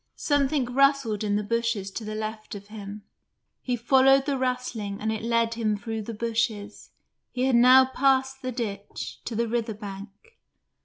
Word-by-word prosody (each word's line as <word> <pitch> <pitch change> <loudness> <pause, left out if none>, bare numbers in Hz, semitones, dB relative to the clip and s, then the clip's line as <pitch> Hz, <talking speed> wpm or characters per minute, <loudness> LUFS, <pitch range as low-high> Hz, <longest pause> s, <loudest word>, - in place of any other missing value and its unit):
Something 285 -2 +1
rustled 265 -4 +2
in 205 -1 0
the 210 - 0
bushes 230 -2 -1
to 220 - -6
the 215 0 -5
left 215 0 -5
of 200 0 -10
him; 205 -1 -8 0.6
he 250 - -1
followed 265 +3 +4
the 285 -1 0
rustling 250 -6 -3
and 220 +1 -1
it 220 - -3
led 230 0 +1
him 220 -2 -1
through 220 +2 -5
the 225 +2 -6
bushes 220 -2 -2 0.4
he 250 - -2
had 260 -1 +3
now 255 +2 +7
passed 265 0 +1
the 255 - -3
ditch 205 -4 -5
to 230 - -4
the 235 +1 0
river 225 -1 -2
bank. 200 -1 -8
230 Hz, 170 wpm, -26 LUFS, 210-255 Hz, 0.6 s, now